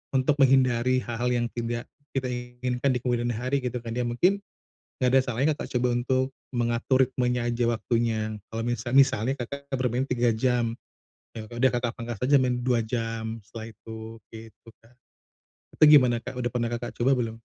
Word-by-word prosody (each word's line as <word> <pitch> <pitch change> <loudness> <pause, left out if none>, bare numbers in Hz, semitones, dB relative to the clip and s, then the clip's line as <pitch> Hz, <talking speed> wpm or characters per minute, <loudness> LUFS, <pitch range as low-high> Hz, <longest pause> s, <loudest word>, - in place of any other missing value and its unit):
untuk 130 +3 +3
menghindari 130 -2 +4
hal-hal 120 +1 -2
yang 120 -1 +1
tidak 120 0 -3 0.3
kita 135 -1 0
inginkan 125 +1 -2
di - - 0
kemudian 120 -1 0
hari 125 +4 -1
gitu 125 0 -3
kan. 115 -1 -5
Ya 125 - -1
mungkin 180 +12 +2 0.6
enggak 125 - +4
ada - - +7
salahnya 125 +5 +1
Kakak, - - -3
coba 125 - +2
untuk 130 +1 +1 0.3
mengatur 120 +2 +1
ritmenya 125 -1 -1
aja, 120 0 -1
waktunya. 110 -2 -1 0.2
Kalau 115 - -2
mis 120 -1 -2
misalnya 135 -2 +4
Kakak, 140 +4 -7
bermain 125 +1 0
3 120 -2 +1
jam, 120 0 +1 0.6
ya 110 - -6
udah 120 +2 +2
Kakak, 120 -1 -2
pangkas 115 -1 -5
aja 140 +2 +5
main 125 -1 +1
2 120 -1 +2
jam 115 -1 -3
setelah 110 +1 -8
itu, 110 +1 -9 0.2
gitu 115 0 -12
kan. 115 +2 -23 0.8
Itu - - +4
gimana 125 -5 +6
Kak, - - -6
udah 120 -1 -1
pernah 120 -1 0
Kakak, 120 0 -4
coba 130 +3 +3
belum? 115 -2 -2
120 Hz, 175 wpm, -26 LUFS, 115-130 Hz, 0.8 s, ada